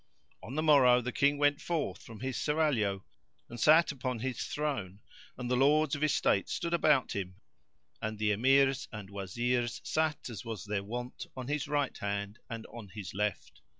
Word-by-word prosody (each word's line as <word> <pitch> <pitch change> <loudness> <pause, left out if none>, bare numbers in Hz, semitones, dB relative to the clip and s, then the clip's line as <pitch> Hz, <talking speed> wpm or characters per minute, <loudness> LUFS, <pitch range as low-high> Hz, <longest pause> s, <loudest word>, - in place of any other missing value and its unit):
On 125 - -8
the 155 - 0
morrow 130 -5 +6
the 125 +1 -3
King 145 +3 +2
went 145 0 +2
forth 150 - -2
from 115 -1 -11
his 130 0 -3
Serraglio 130 -11 +1 0.5
and 120 - -8
sat 155 +6 +6
upon 130 -3 -3
his 125 +1 -3
throne, 130 -11 -3 0.4
and 125 -1 -4
the 125 - +1
Lords 150 +4 +3
of 145 0 -1
Estate 140 -9 +2
stood 170 -1 -2
about 150 -5 +3
him, 95 -2 -4 0.7
and 110 0 -3
the 105 0 +1
Emirs 135 +5 +3
and 105 -4 -8
Wazirs 120 +5 -1
sat 155 -1 -1
as 115 -5 -7
was 115 -6 -6
their 105 -1 -2
wont 120 +4 -6
on 130 -1 -5
his 150 -1 -1
right 145 -2 0
hand 100 +1 -3
and 115 -2 -6
on 115 -3 -8
his 100 -2 -7
left. 105 0 -3
125 Hz, 180 wpm, -31 LUFS, 105-145 Hz, 0.7 s, morrow